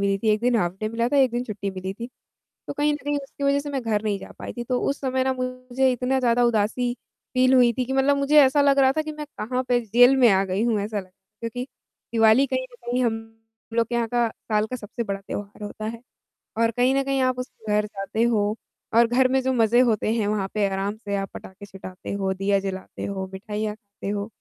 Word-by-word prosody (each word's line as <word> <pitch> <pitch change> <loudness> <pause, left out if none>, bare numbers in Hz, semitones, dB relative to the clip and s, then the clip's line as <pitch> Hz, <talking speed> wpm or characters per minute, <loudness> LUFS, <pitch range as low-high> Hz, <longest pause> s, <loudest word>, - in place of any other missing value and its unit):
मिली 200 0 +2
थी, 220 - -1
1 210 0 +2
दिन 245 0 +2
half 175 -4 0
day 215 - -1
मिला 230 +2 0
था, 285 - +1
1 265 -2 +5
दिन 240 +1 -1
छुट्टी 200 -3 -4
मिली 190 0 -5
थी, 230 +3 -6 0.6
तो - - -2
कहीं 295 +1 +1
न - - -2
कहीं 290 0 0
उसकी 280 0 -7
वजह 280 0 +3
से 290 0 -6
मैं 270 -2 -2
घर 215 -2 0
नहीं 210 -2 -1
जा - - -11
पाई - - -6
थी। 240 - -5
तो 250 +1 -1
उस 280 - -4
समय 260 -1 0
ना 265 - +2
मुझे 255 +1 -1
इतना 250 +2 0
ज़्यादा 245 -1 +3
उदासी 235 +2 +1 0.4
फील 255 +1 +4
हुई 245 -2 +6
थी 250 +2 -1
कि 260 - -4
मतलब 270 +1 +3
मुझे 280 +2 +5
ऐसा 270 +2 +4
लग 280 -1 +4
रहा 265 -1 +5
था 310 - +2
कि 310 0 -5
मैं 300 0 -7
कहाँ 250 +4 -1
पे, 245 -1 +3
जेल 245 +4 +5
में 250 -3 +6
आ 195 0 +3
गई 190 +2 -1
हूँ, 225 -3 +1
ऐसा 205 +1 -2
लग 185 - -14 0.3
क्योंकि 240 +2 -4 0.5
दिवाली 225 +4 +5
कहीं 260 -1 -1
न - - -14
कहीं 250 +1 0
हम 225 -1 +1 0.6
लोग 230 -1 +2
के 240 - -4
यहाँ 235 -1 0
का 240 0 +1 0.2
साल 215 -1 +2
का 255 - -4
सबसे 225 +1 -5
बड़ा 200 -2 -3
त्योहार 205 +1 -7
होता 210 +1 -7
है। 230 +1 -5 0.6
और 230 0 +3
कहीं 250 +3 +2
न 275 - +3
कहीं 275 -1 0
आप 255 -1 +1
उस 250 - -4 0.2
घर 210 0 +2
जाते 205 +2 -3
हो 210 -3 +1 0.4
और 235 0 +7
घर 255 +2 +3
में 265 +1 +2
जो 260 0 +1
मज़े 230 0 +4
होते 220 -1 +1
हैं 220 -3 0
वहाँ 205 -2 -1
पे 210 -2 +2
आराम 195 +2 -2
से 205 -2 -4
आप 195 -1 -3
पटाखे 195 +2 -10
छुटाते 190 -2 -9
हो, 195 -1 -1
दिया 195 +1 +1
जलाते 190 -1 -6
हो, 190 -1 -4
मिठाइयाँ 210 +2 -4
खाते 200 -2 -10
हो, 205 0 -2
230 Hz, 250 wpm, -24 LUFS, 205-255 Hz, 0.6 s, और